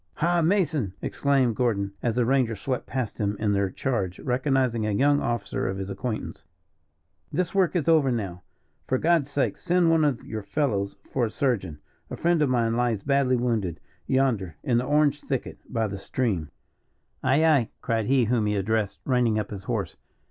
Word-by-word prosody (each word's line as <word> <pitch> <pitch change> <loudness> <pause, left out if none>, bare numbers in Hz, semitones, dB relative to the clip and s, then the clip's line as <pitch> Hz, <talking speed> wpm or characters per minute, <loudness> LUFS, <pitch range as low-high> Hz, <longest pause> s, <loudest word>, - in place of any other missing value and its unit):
"Ha, 170 +1 +2
Mason," 160 - +1
exclaimed 135 -5 +1
Gordon, 100 -5 0
as 115 -2 0
the 125 -1 +2
rangers 120 -4 +1
swept 130 -2 -3
past 125 -5 -3
him 105 -1 -1
in 105 -1 +1
their 100 -1 +1
charge, 95 -5 -2
recognizing 130 -3 0
a 110 - 0
young 145 +7 +3
officer 120 -3 -2
of 95 - -2
his 95 0 -4
acquaintance. 100 -7 -4 0.9
"This 175 +4 -1
work 190 -2 +2
is 165 -5 0
over 155 -5 +4
now. 95 -7 -3 0.5
For 130 - +1
God's 160 -1 +2
sake 140 -1 0
send 175 -1 +2
one 165 -1 +4
of 145 -5 0
your 110 -1 -5
fellows 100 -3 -1 0.2
for 125 -3 +1
a - - -5
surgeon. 105 - -1 0.3
A - - -6
friend 170 -1 +2
of 145 - +3
mine 115 -2 +1
lies 120 -4 0
badly 140 -2 +2
wounded, 110 - -1 0.3
yonder, 115 -11 +1
in 120 -2 +2
the 125 - -2
orange 145 0 +2
thicket, 135 -3 -4
by 115 -2 0
the 100 -1 -6
stream." 95 - -2 0.7
"Aye, 140 +5 +3
aye!" 145 -8 +3
cried 115 -2 0
he 130 -2 +3
whom 110 -2 +1
he 105 - 0
addressed, 100 +1 -1
reining 125 -4 +2
up 105 -2 -3
his 100 -2 -7
horse. - - -3
120 Hz, 185 wpm, -26 LUFS, 105-140 Hz, 0.9 s, over